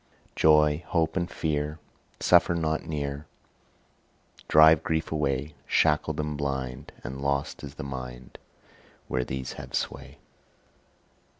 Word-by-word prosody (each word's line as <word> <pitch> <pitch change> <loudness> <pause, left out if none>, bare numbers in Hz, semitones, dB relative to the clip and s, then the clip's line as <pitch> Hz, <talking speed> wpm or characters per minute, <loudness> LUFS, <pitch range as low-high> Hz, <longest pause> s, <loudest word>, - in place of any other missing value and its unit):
Joy, 75 +1 +4
hope 80 -2 +1
and 85 -2 -1
fear 75 -1 -2 0.4
Suffer 85 - +4
not 80 -2 -1
near, 70 -1 -4 1.2
Drive 80 0 +7
grief 80 0 -1
away: 75 -1 -1
Shackled 75 +1 +2
and 75 -1 -2
blind 65 -3 -4
And 65 +2 -6
lost 70 0 -1
is 70 -1 -8
the - - -6
mind 65 -2 -8 0.7
Where 65 0 0
these 65 +1 -5
have - - -7
sway. - - -4
75 Hz, 115 wpm, -27 LUFS, 70-80 Hz, 1.2 s, Drive